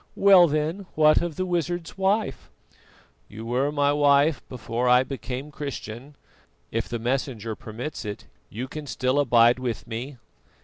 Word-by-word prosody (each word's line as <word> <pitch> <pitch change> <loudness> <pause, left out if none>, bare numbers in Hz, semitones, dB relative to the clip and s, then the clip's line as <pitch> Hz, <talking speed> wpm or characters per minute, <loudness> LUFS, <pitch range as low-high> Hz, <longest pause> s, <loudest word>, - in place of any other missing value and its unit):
"Well, 190 -3 +7
then, 155 +6 -2
what 155 0 +5
of 170 -3 -3
the 185 - -2
wizard's 175 -1 -2
wife?" 195 - -1 0.8
"You 110 +2 -9
were 130 +5 0
my 145 -1 +2
wife 145 +1 +3
before 125 0 -2
I 125 +1 +6
became 135 +1 -6
Christian; 140 -2 -7 0.6
if - - -2
the 120 - -2
Messenger 120 -2 -2
permits 120 +7 -7
it, 105 -2 -6 0.2
you 120 +5 -5
can 150 +2 -8
still 130 +1 0
abide 120 -2 +4
with 120 -4 -4
me." 120 +4 -6
135 Hz, 145 wpm, -25 LUFS, 120-155 Hz, 0.8 s, Well